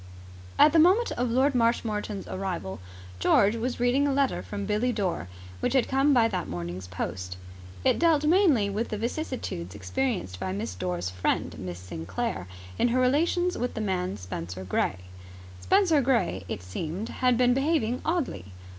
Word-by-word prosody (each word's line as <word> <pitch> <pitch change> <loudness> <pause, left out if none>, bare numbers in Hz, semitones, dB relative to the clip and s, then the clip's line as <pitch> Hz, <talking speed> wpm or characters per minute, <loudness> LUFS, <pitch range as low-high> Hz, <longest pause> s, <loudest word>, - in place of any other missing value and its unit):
At 300 - +7
the 330 - +6
moment 380 +9 +5
of 245 0 -1
Lord 265 +4 +3
Marshmoreton's 225 -4 0
arrival, 180 - -4 0.4
George 205 - +4
was 240 +2 -3
reading 250 +4 +3
a - - +1
letter 275 -1 +1
from 200 -1 -5
Billie 215 +5 +1
Dore, 195 - -2 0.3
which - - 0
had 265 -3 +3
come 270 +2 +3
by 240 -4 +5
that 185 -5 -3
morning's 85 +1 -5
post. 90 0 -5 0.5
It - - +3
dealt 325 -3 +4
mainly 310 - +4
with 210 +4 -2
the 215 - -3
vicissitudes 230 - -4
experienced 105 - -2
by 95 0 -3
Miss 105 +1 -3
Dore's 90 0 -3
friend, 90 0 -1
Miss 90 -2 -5
Sinclair, 90 +1 -4 0.3
in - - +4
her 245 +2 +1
relations 335 +7 +2
with 245 0 -2
the 220 - -2
man 185 - -1
Spenser 90 -1 -6
Gray. 95 0 0 0.6
Spenser 370 -7 +3
Gray, 230 - +1
it 90 - -4
seemed, 160 - -4
had 250 -2 +2
been 245 0 +4
behaving 270 -4 +1
oddly. 305 - -1
220 Hz, 165 wpm, -27 LUFS, -, 0.6 s, At